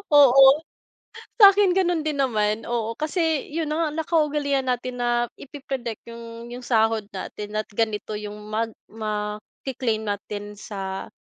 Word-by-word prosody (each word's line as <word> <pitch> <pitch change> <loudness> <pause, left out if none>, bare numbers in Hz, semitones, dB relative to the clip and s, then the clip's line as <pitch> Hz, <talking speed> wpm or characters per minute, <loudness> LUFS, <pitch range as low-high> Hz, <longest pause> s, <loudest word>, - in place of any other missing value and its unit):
Oo, 270 -1 +9 0.9
sa 400 -3 +10
akin 405 -1 +4
ganon 350 -3 +2
din 305 -2 -2
naman. 215 -5 +1
Oo, 230 -1 -2
kasi 315 -1 0
'yun 320 -2 -1
'no, 320 +2 +1
nakaugalian 300 -4 +1
natin 250 0 -2
na 240 -1 +1
ipi-predict 265 -5 -6
'yung 230 0 -9
'yung 245 +1 -7
sahod 225 -2 +2
natin 210 +2 -6
at 215 0 -1
ganito 215 0 -2
'yung 210 0 -6 0.2
mag 225 +1 -1 0.2
maki-claim 215 +2 -3
natin 205 0 -5
sa 195 -2 -5
240 Hz, 135 wpm, -24 LUFS, 215-285 Hz, 0.9 s, sa